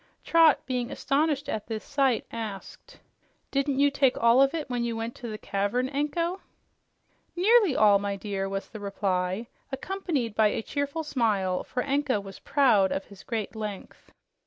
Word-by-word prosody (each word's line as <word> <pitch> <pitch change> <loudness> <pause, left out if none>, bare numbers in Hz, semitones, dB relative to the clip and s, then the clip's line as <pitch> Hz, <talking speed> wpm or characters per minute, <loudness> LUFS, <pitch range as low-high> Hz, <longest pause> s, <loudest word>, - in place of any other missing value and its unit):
Trot, 325 -3 +5
being 250 -2 -2
astonished 290 +1 0
at 215 - -3
this 220 -1 -4
sight, 275 -4 +1
asked, 215 -4 -8 0.5
"Didn't 275 0 0
you 285 +1 +4
take 275 -2 +2
all 235 +3 +5
of 275 0 +4
you 315 -2 -3
when 245 -2 -2
you 235 -1 -2
went 225 +1 -4
to 240 - -7
the 215 -1 -5
cavern, 210 +6 -1
Anko?" 335 +6 -1 0.9
"Nearly 400 - +4
all, 205 -2 +5
my 200 0 -2
dear," 195 -1 -3
was 195 0 -4
the 220 - -9
reply, 195 0 -1 0.3
accompanied 285 - -2
by 215 0 +4
a 215 - -2
cheerful 285 +5 -3
smile, 210 -10 0
for 250 - -3
Anko 280 -4 0
was 195 -1 -10
proud 225 -9 +3
of 195 - -2
his 200 -2 -14
great 225 -3 -4
length. 210 -3 -7
240 Hz, 165 wpm, -27 LUFS, 205-285 Hz, 0.9 s, Trot